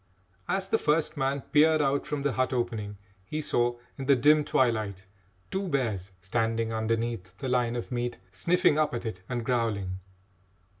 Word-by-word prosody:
As 190 Hz, 0 st, 0 dB
the 225 Hz, -, +2 dB
first 150 Hz, +1 st, +1 dB
man 135 Hz, 0 st, 0 dB
peered 155 Hz, +3 st, +4 dB
out 140 Hz, -1 st, +1 dB
from 145 Hz, -2 st, -2 dB
the 145 Hz, -, +2 dB
hut 130 Hz, +1 st, 0 dB
opening, 110 Hz, -4 st, -2 dB, 0.3 s
he 150 Hz, +10 st, -4 dB
saw, 120 Hz, -5 st, +1 dB, 0.2 s
in 135 Hz, -, -4 dB
the 140 Hz, -, +6 dB
dim 150 Hz, +4 st, +5 dB
twilight, 110 Hz, -8 st, 0 dB, 0.5 s
two 190 Hz, 0 st, -1 dB
bears 110 Hz, -, -1 dB
standing 115 Hz, +2 st, 0 dB
underneath 110 Hz, -4 st, -2 dB
the 135 Hz, -, -4 dB
line 125 Hz, -2 st, +1 dB
of 120 Hz, -, -5 dB
meat, 120 Hz, -1 st, -2 dB
sniffing 155 Hz, -, +2 dB
up 150 Hz, -5 st, +1 dB
at 120 Hz, -, -4 dB
it 95 Hz, -5 st, -4 dB
and 120 Hz, -2 st, -2 dB
growling. 105 Hz, -7 st, -1 dB
120 Hz, 165 wpm, -28 LUFS, 110-140 Hz, 0.5 s, the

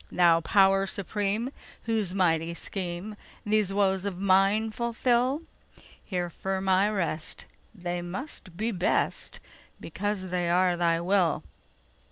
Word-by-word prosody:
Thou 170 Hz, -2 st, +4 dB
Power 195 Hz, +2 st, +4 dB
Supreme, 205 Hz, +5 st, -1 dB, 0.3 s
whose 220 Hz, -5 st, 0 dB
mighty 170 Hz, -3 st, +1 dB
schemeThese 200 Hz, +3 st, -3 dB
woes 195 Hz, -1 st, +2 dB
of 200 Hz, -3 st, -3 dB
mine 195 Hz, +3 st, +3 dB
fulfil, 245 Hz, +4 st, +1 dB, 0.6 s
Here 175 Hz, -3 st, -3 dB
firm 190 Hz, +2 st, -3 dB
I 190 Hz, +2 st, +4 dB
rest; 170 Hz, -6 st, -3 dB, 0.3 s
they 175 Hz, -2 st, -3 dB
must 180 Hz, -, -7 dB
be 225 Hz, +3 st, -1 dB
best, 180 Hz, -3 st, 0 dB, 0.4 s
Because 190 Hz, +2 st, -3 dB
they 175 Hz, -1 st, 0 dB
are 180 Hz, 0 st, +3 dB
Thy 170 Hz, -1 st, +2 dB
will! 180 Hz, -2 st, +2 dB
190 Hz, 115 wpm, -28 LUFS, 175-210 Hz, 0.6 s, Thou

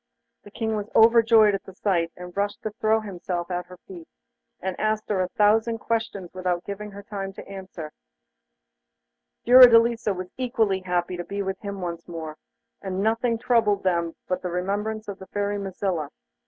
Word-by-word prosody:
The -, -, -14 dB
King 220 Hz, +1 st, -2 dB
was 210 Hz, 0 st, -4 dB
overjoyed 225 Hz, -2 st, +6 dB
at 195 Hz, -, -3 dB
the 190 Hz, -, -12 dB
sight, 170 Hz, -5 st, 0 dB
and 180 Hz, 0 st, -9 dB
rushed 205 Hz, +1 st, -2 dB
to 215 Hz, -, -3 dB
throw 220 Hz, +1 st, +1 dB
himself 180 Hz, -3 st, -4 dB
at 180 Hz, 0 st, -3 dB
her 180 Hz, 0 st, -12 dB
feet, 175 Hz, -4 st, -10 dB, 0.5 s
and 190 Hz, -1 st, -3 dB
asked 215 Hz, 0 st, 0 dB
her 195 Hz, -3 st, +1 dB
a 185 Hz, -, 0 dB
thousand 220 Hz, +4 st, +2 dB
questions 220 Hz, -5 st, -3 dB
without 180 Hz, -1 st, -2 dB
giving 205 Hz, +1 st, -6 dB
her 200 Hz, 0 st, -10 dB
time 195 Hz, -1 st, -5 dB
to -, -, -11 dB
answer 190 Hz, -4 st, -8 dB, 1.6 s
one. -, -, -49 dB
Fiordelisa 235 Hz, -3 st, +7 dB
was 185 Hz, 0 st, -6 dB
equally 225 Hz, -6 st, +1 dB
happy 180 Hz, -1 st, -2 dB
to 175 Hz, -, -4 dB
be 200 Hz, +2 st, -4 dB
with 190 Hz, 0 st, -4 dB
him 200 Hz, -2 st, -6 dB
once 170 Hz, -1 st, -5 dB
more, 160 Hz, -3 st, -6 dB, 0.5 s
and 190 Hz, 0 st, -3 dB
nothing 230 Hz, +2 st, +1 dB
troubled 225 Hz, -4 st, +2 dB
them 170 Hz, -3 st, 0 dB
but 185 Hz, -, -1 dB
the 180 Hz, -, -3 dB
remembrance 205 Hz, +5 st, -2 dB
of 200 Hz, -1 st, -6 dB
the 190 Hz, -, -11 dB
Fairy 205 Hz, 0 st, -2 dB
Mazilla. 190 Hz, -5 st, -3 dB
200 Hz, 180 wpm, -25 LUFS, 180-220 Hz, 1.6 s, Fiordelisa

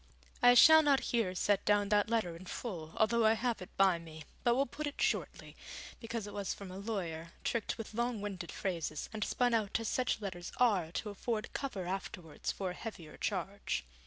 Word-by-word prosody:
I 245 Hz, 0 st, +8 dB
shall 315 Hz, +5 st, +9 dB
not 285 Hz, -3 st, +4 dB
here 220 Hz, -6 st, +1 dB
set 200 Hz, +1 st, +2 dB
down 205 Hz, -1 st, +3 dB
that 210 Hz, 0 st, +3 dB
letter 220 Hz, -8 st, 0 dB
in 180 Hz, +2 st, -11 dB
full, 170 Hz, -10 st, -5 dB
although 230 Hz, +1 st, +3 dB
I 220 Hz, 0 st, +6 dB
have 235 Hz, -1 st, -1 dB
it 185 Hz, -, -8 dB
by 190 Hz, -3 st, +4 dB
me, 160 Hz, -2 st, -10 dB, 0.2 s
but 240 Hz, 0 st, +4 dB
will 275 Hz, +2 st, +3 dB
put 300 Hz, +4 st, -5 dB
it 290 Hz, -, -6 dB
shortly, -, -, -1 dB, 0.4 s
because 230 Hz, -2 st, -4 dB
it 205 Hz, -, -8 dB
was 200 Hz, -2 st, -2 dB
from 195 Hz, -2 st, -9 dB
a 185 Hz, -, -7 dB
lawyer, 170 Hz, -6 st, -4 dB
tricked 230 Hz, -3 st, -1 dB
with 225 Hz, -1 st, -7 dB
long 235 Hz, 0 st, -1 dB
winded 195 Hz, -4 st, -5 dB
phrases 165 Hz, -5 st, -3 dB
and 215 Hz, -1 st, -2 dB
spun 245 Hz, +2 st, +1 dB
out 220 Hz, -2 st, +1 dB
as 225 Hz, -, -3 dB
such 250 Hz, -3 st, 0 dB
letters 185 Hz, -4 st, -5 dB
are 200 Hz, -10 st, +3 dB
to 210 Hz, -, -3 dB
afford 215 Hz, +2 st, -3 dB
cover 210 Hz, -10 st, -3 dB
afterwards 180 Hz, -3 st, -4 dB
for 190 Hz, -2 st, -3 dB
a -, -, -5 dB
heavier 180 Hz, -6 st, -8 dB
charge. 195 Hz, -, -2 dB
205 Hz, 200 wpm, -33 LUFS, 180-230 Hz, 0.4 s, shall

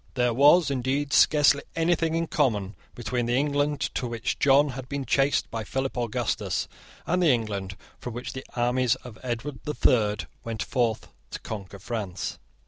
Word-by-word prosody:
There 125 Hz, -2 st, +2 dB
was, 145 Hz, +5 st, +5 dB
indeed, 140 Hz, +3 st, -1 dB
scarcely 145 Hz, -2 st, +5 dB
anything 165 Hz, -1 st, +1 dB
in 165 Hz, 0 st, 0 dB
common 110 Hz, -, 0 dB, 0.2 s
between 120 Hz, 0 st, -2 dB
the 120 Hz, -, +1 dB
England 145 Hz, +1 st, +1 dB
to 125 Hz, -, -2 dB
which 115 Hz, -1 st, -3 dB
John 140 Hz, +1 st, +5 dB
had 130 Hz, -1 st, -7 dB
been 140 Hz, -1 st, -3 dB
chased 135 Hz, +3 st, +1 dB
by 115 Hz, -1 st, -3 dB
Philip 135 Hz, +5 st, -3 dB
Augustus, 120 Hz, -3 st, -1 dB, 0.4 s
and 180 Hz, +2 st, +1 dB
the 175 Hz, -, +4 dB
England 100 Hz, -6 st, -1 dB, 0.2 s
from 120 Hz, -2 st, -6 dB
which 120 Hz, -, -5 dB
the 130 Hz, -, -6 dB
armies 125 Hz, 0 st, +2 dB
of 115 Hz, -3 st, -10 dB
Edward 125 Hz, +2 st, -4 dB
the 150 Hz, -, -4 dB
Third 105 Hz, -4 st, +2 dB, 0.2 s
went 115 Hz, -1 st, -3 dB
forth 120 Hz, -3 st, -1 dB, 0.2 s
to -, -, -6 dB
conquer 100 Hz, -2 st, -7 dB
France. 100 Hz, -3 st, -4 dB
125 Hz, 165 wpm, -26 LUFS, 115-145 Hz, 0.4 s, was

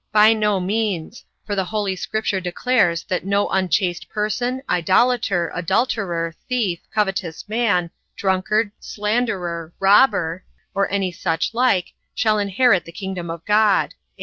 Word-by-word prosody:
A. -, -, -48 dB
By 215 Hz, +1 st, +7 dB
no 210 Hz, -3 st, +1 dB
means; 200 Hz, 0 st, -2 dB, 0.2 s
for 205 Hz, -, -3 dB
the 190 Hz, -2 st, 0 dB
holy 205 Hz, -1 st, -2 dB
scripture 200 Hz, 0 st, -2 dB
declares 180 Hz, -2 st, +1 dB
that 180 Hz, -, -2 dB
no 200 Hz, +1 st, +1 dB
unchaste 185 Hz, -1 st, 0 dB
person, 245 Hz, +5 st, -2 dB
idolater, 185 Hz, 0 st, +2 dB
adulterer, 175 Hz, -3 st, -1 dB, 0.2 s
thief, 215 Hz, -9 st, 0 dB
covetous 195 Hz, -6 st, -2 dB
man, 205 Hz, -6 st, +1 dB, 0.2 s
drunkard, 200 Hz, +3 st, 0 dB
slanderer, 195 Hz, -7 st, -2 dB
robber, 190 Hz, -4 st, +3 dB, 0.3 s
or 200 Hz, 0 st, 0 dB
any 195 Hz, -2 st, 0 dB
such 170 Hz, +2 st, -2 dB
like, 230 Hz, -7 st, +1 dB, 0.2 s
shall 215 Hz, -1 st, +2 dB
inherit 200 Hz, -1 st, +3 dB
the 170 Hz, -, -10 dB
kingdom 185 Hz, -2 st, -5 dB
of 165 Hz, 0 st, -7 dB
God. 210 Hz, -1 st, +3 dB
195 Hz, 130 wpm, -21 LUFS, 180-215 Hz, 0.3 s, By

